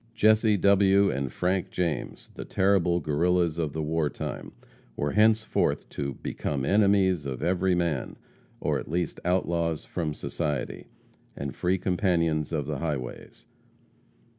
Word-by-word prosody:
Jesse 110 0 +4
W. 100 0 +4
and 70 -2 -3
Frank 90 +1 -1
James, 85 -4 -3
the - - -7
terrible 95 -3 +2
Guerrillas 85 +1 +1
of 75 -4 -1
the 80 - -2
war 80 0 0
time, - - -6 0.4
were 75 - -1
henceforth 110 +1 +2
to 70 -2 -4
"become 70 -3 -2
enemies 95 -5 +3
of 65 -2 -4
every 90 +1 +2
man," 85 -6 -1 0.4
or - - 0
at - - -9
least 85 +2 -2
outlaws 85 -3 0
from 80 -4 -3
society, 75 +1 -3 0.5
and 70 -1 -5
free 90 +2 +1
companions 85 -5 0
of 75 -4 -1
the 75 -1 -3
highways. 70 -6 -5
85 Hz, 135 wpm, -27 LUFS, 75-95 Hz, 0.5 s, Jesse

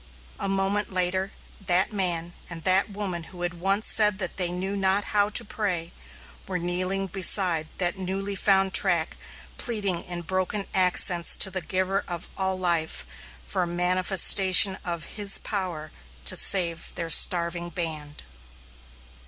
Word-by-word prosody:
A - - -3
moment 195 +2 -2
later, 185 +1 -2 0.3
that 185 +3 +1
man 175 -3 -2 0.2
and 165 -2 -9
that 190 +3 +3
woman 195 -5 -5
who 175 +1 -10
had 175 0 -2
once 195 +3 0
said 210 -2 +3
that 185 -4 -6
they 180 -2 +3
knew 185 +3 -5
not 195 +1 0
how 205 0 +1
to 210 - 0
pray, 180 -6 -4 0.6
were 185 - -3
kneeling 185 +2 -3
beside 180 -3 +2
that 180 +1 -3
newly 195 +2 -4
found 195 -1 0
track 175 -5 +1 0.4
pleading 200 -7 -2
in 175 -1 -6
broken 185 +3 -3
accents 180 -2 +3
to 190 - +3
the 185 0 -5
Giver 190 +2 -3
of 175 -2 -5
all 190 -1 -1
life, 170 -3 -2 0.4
for 190 - -3
a 175 - -2
manifestation 185 +2 +5
of 170 -3 -5
His 200 -2 +7
power 180 -7 -6 0.3
to - - -2
save 170 -4 +2
their 165 -1 -4
starving 170 +1 +4
band. 155 -4 -7
185 Hz, 145 wpm, -24 LUFS, 175-195 Hz, 0.6 s, His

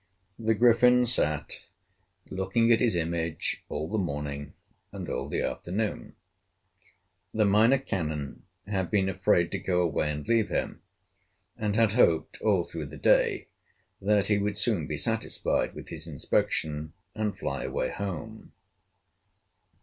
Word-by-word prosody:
The 110 0 +1
Griffin 125 +2 +5
sat 75 -11 0 0.6
looking 115 +5 +1
at 115 - +4
his 120 -6 +3
image 85 -1 -2
all 80 - -3
the 110 +5 -1
morning 75 -4 -4 0.4
and - - -7
all - - -3
the - - -1
afternoon. 105 +4 -3 1.2
The 110 -1 +3
Minor 110 +6 +5
Canon 80 - -4 0.2
had 95 -4 -2
been 95 +1 +2
afraid 95 -2 +2
to - - -2
go 90 -2 0
away 75 -2 0
and 75 0 -5
leave 115 -2 +2
him, - - -2 0.7
and 105 -1 -2
had 110 -2 +3
hoped 85 -10 +2
all 100 -5 +3
through 80 -3 -6
the 75 +2 -10
day - - +2 0.5
that 100 0 +2
he 105 -1 +2
would 100 0 -1
soon 105 -8 +1
be - - -3
satisfied - - 0
with - - -9
his 80 0 -4
inspection 75 +1 -1 0.2
and 105 -1 -2
fly - - -3
away - - -2
home. 100 +3 -6
95 Hz, 140 wpm, -28 LUFS, 80-110 Hz, 1.2 s, Griffin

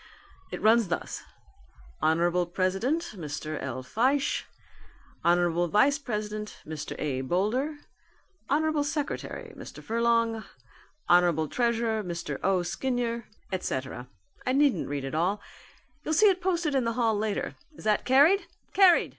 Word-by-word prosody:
It - - -6
runs 225 0 +5
thus: 175 - -3 0.8
Hon. 170 +3 +2
President 195 - 0
Mr. 155 -3 -5
L. 130 -1 -4
Fyshe, 260 - +1 0.8
Hon. 175 0 +3
Vice 275 - +4
president, 210 -4 -4
Mr. 155 -1 -6
A. 135 -3 -1
Boulder, 215 - 0 0.7
Hon. 310 +1 +2
Secretary 295 -1 -4
Mr. - - -10
Furlong, 230 -1 +1 0.6
Hon. 175 -3 +4
Treasurer 230 -2 0
Mr. 170 -1 -4
O. 185 -1 +2
Skinyer, 235 +5 -2 0.3
et 185 -1 -1
cetera 130 -1 -4 0.4
I 255 - 0
needn't 280 -1 +3
read 140 -1 -3
it 135 - -5
all. 180 +6 +1 0.6
You'll 315 - 0
see 420 +6 +7
it 375 -1 0
posted 345 -4 0
in 265 -2 +2
the 230 0 0
hall 225 -2 +2
later. 210 0 -2 0.2
Is - - -12
that 215 -1 +2
carried? 290 +10 +5 0.3
Carried! 375 -3 +6
215 Hz, 130 wpm, -28 LUFS, 175-265 Hz, 0.8 s, see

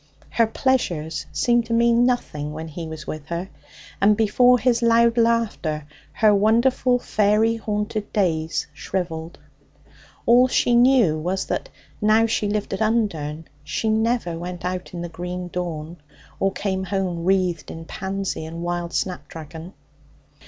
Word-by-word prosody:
Her 230 0 +3
pleasures 170 - -1
seemed 240 -1 +2
to 230 - -2
mean 235 +1 +4
nothing 150 -12 -2
when 160 +1 -6
he 165 +1 -6
was 160 -1 -8
with 155 -1 -6
her 170 +3 -4 0.5
and 205 +1 +5
before 245 +3 +4
his 240 0 +2
loud 230 0 +4
laughter 230 -10 +1 0.3
her 215 -1 +4
wonderful 235 +5 +3
faery 215 0 +2
haunted 210 -1 -3
days 165 -7 0
shrivelled. 165 0 -4 0.9
All 245 +2 +6
she 245 -1 +2
knew 240 -10 +4
was 185 +4 -2
that, - - -3 0.3
now 215 +2 +4
she 215 -2 0
lived 210 -1 -2
at 195 - -3
Undern, 165 -9 0 0.2
she 155 +9 -2
never 220 -6 0
went 175 0 -6
out 180 0 -3
in 170 - -4
the - - -3
green 180 +1 -5
dawn 170 -2 -5 0.4
or 195 - +2
came 190 -1 -2
home 185 -3 -2
wreathed 180 -3 +1
in 165 0 -8
pansy 190 -1 -4
and 165 +2 -6
wild 175 0 -3
snapdragon. 165 -1 -5
195 Hz, 145 wpm, -23 LUFS, 170-230 Hz, 0.9 s, All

